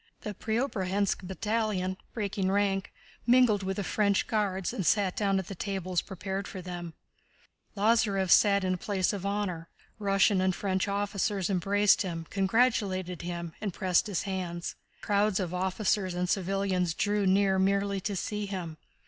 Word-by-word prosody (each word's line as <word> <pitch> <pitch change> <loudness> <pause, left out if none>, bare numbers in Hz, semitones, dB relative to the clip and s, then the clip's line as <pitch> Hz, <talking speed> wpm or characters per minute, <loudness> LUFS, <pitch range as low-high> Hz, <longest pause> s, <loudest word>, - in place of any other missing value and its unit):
The 210 - -5
Preobrazhénsk 205 -4 -1
battalion, 205 -2 -1 0.2
breaking 200 -3 -2
rank, 195 -1 0 0.4
mingled 240 -4 +5
with 190 0 -3
the 200 - -1
French 200 0 +1
Guards 195 -4 -1
and 190 - -2
sat 195 +1 +2
down 200 -2 +1
at 190 - -2
the - - -5
tables 185 -2 -2
prepared 190 0 -5
for 190 - -7
them. 175 -2 -7 0.8
Lázarev 205 -3 +2
sat 200 -2 +5
in 185 - +1
the 185 - 0
place 195 0 0
of 200 -1 -3
honor. 190 -5 -2 0.3
Russian 195 -1 +3
and 185 -1 +1
French 190 -1 -1
officers 200 -1 -1
embraced 200 +2 +3
him, 165 -4 -3
congratulated 195 -4 +1
him, 170 -1 -5
and 200 -5 -3
pressed 185 0 +2
his 200 -5 -2
hands. 180 -3 -4 0.3
Crowds 205 -1 +2
of 180 -2 -3
officers 190 0 0
and 180 0 -1
civilians 185 -2 0
drew 205 -1 +1
near 190 0 +3
merely 200 0 +1
to 200 +1 -2
see 210 +2 -3
him. 175 -5 -5
195 Hz, 155 wpm, -29 LUFS, 185-205 Hz, 0.8 s, mingled